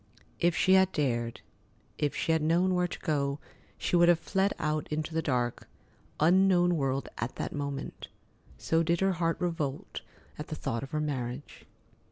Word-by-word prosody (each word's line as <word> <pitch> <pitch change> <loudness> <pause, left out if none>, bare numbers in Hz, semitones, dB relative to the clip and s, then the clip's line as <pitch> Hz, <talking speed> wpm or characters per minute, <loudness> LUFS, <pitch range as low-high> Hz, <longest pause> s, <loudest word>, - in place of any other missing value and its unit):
If 175 -1 +2
she 190 - +4
had 190 0 +5
dared, 120 -5 -1 0.6
if 145 -2 0
she - - 0
had 160 -1 +2
known 175 +4 +2
where 180 0 +2
to - - -7
go, 140 -2 0 0.4
she - - -1
would 175 0 +6
have 175 - +6
fled 195 +4 0
out 155 -1 -1
into 155 +1 -3
the 160 - +1
dark, 125 -5 -1 0.5
unknown 175 +1 +4
world 135 -2 -1
at 120 +3 -3
that - - -4
moment, 140 -1 -5 0.5
so 165 0 +1
did 170 +1 +1
her 195 0 +3
heart 165 -1 0
revolt 155 -6 -3 0.4
at - - -5
the - - -4
thought 115 - -3
of 135 - -7
her 155 - -2
marriage. 135 -2 -4
155 Hz, 175 wpm, -29 LUFS, 140-175 Hz, 0.6 s, would